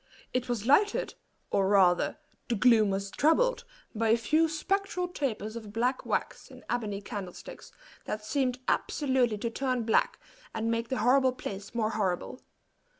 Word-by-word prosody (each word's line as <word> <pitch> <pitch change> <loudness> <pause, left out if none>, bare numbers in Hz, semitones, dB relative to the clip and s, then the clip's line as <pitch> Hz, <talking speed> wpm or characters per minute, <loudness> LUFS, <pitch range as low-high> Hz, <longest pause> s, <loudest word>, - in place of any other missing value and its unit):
It 255 0 -1
was 230 -3 -2
lighted, 390 - +3 0.4
or 195 -1 +2
rather 190 -3 +3 0.3
the 240 - 0
gloom 220 -2 +5
was 195 0 -2
troubled, 480 +12 +2 0.3
by 225 0 0
a 225 - +5
few 310 +7 +2
spectral 375 +3 -1
tapers 235 - -3
of 220 -3 -8
black 245 +4 -1
wax - - -2
in - - -14
ebony 210 -4 -2
candlesticks, 195 -3 -8 0.3
that 215 0 -4
seemed 255 0 0
absolutely 260 -6 +1
to 230 +2 -3
turn 255 -1 -1
black, 225 - +2 0.4
and 225 +1 -1
make 230 0 -2
the 260 - -1
horrible 260 0 +4
place 200 -3 -7
more 220 -2 0
horrible. 195 +3 -2
235 Hz, 150 wpm, -29 LUFS, 210-265 Hz, 0.4 s, gloom